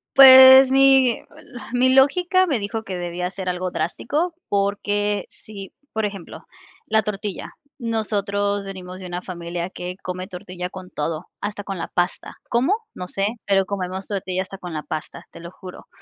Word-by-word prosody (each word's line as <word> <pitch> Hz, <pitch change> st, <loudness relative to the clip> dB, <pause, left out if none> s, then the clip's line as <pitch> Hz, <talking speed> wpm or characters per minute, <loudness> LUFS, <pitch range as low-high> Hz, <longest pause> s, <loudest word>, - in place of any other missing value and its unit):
Pues 260 Hz, 0 st, +10 dB
mi, 270 Hz, -3 st, +4 dB, 0.2 s
la 245 Hz, -, -11 dB
mi 255 Hz, +1 st, +3 dB
lógica 360 Hz, +7 st, +4 dB
me 280 Hz, -10 st, 0 dB
dijo 205 Hz, +2 st, -4 dB
que 190 Hz, -3 st, -5 dB
debía 175 Hz, +1 st, -3 dB
ser 190 Hz, -1 st, -5 dB
algo 180 Hz, 0 st, -3 dB
drástico, 300 Hz, -, -2 dB
porque 205 Hz, +1 st, 0 dB
si, 200 Hz, -3 st, -11 dB, 0.2 s
por 220 Hz, -1 st, -1 dB
ejemplo, 200 Hz, -4 st, -8 dB, 0.4 s
la 220 Hz, 0 st, +2 dB
tortilla 205 Hz, -1 st, -5 dB, 0.3 s
nosotros 205 Hz, -3 st, -1 dB
venimos 185 Hz, -1 st, -8 dB
de 185 Hz, -, -8 dB
una 175 Hz, 0 st, -5 dB
familia 175 Hz, 0 st, -5 dB
que 180 Hz, -1 st, -6 dB
come 185 Hz, 0 st, -5 dB
tortilla 180 Hz, -1 st, -7 dB
con 185 Hz, 0 st, -10 dB
todo, 155 Hz, +2 st, -4 dB
hasta 205 Hz, 0 st, -4 dB
con 195 Hz, -2 st, -5 dB
la -, -, -4 dB
pasta. 175 Hz, 0 st, -2 dB
¿Cómo? 260 Hz, -, +2 dB, 0.2 s
No 180 Hz, -, -7 dB
sé, 195 Hz, +2 st, 0 dB, 0.2 s
pero 195 Hz, -1 st, +3 dB
comemos 190 Hz, -1 st, -4 dB
tortilla 190 Hz, -2 st, -2 dB
hasta 195 Hz, 0 st, -11 dB
con 180 Hz, -2 st, -7 dB
la 155 Hz, -1 st, -4 dB
pasta, 155 Hz, -, -6 dB
te -, -, -12 dB
lo 170 Hz, 0 st, -9 dB
juro. 185 Hz, 0 st, -12 dB
195 Hz, 170 wpm, -22 LUFS, 180-220 Hz, 0.4 s, Pues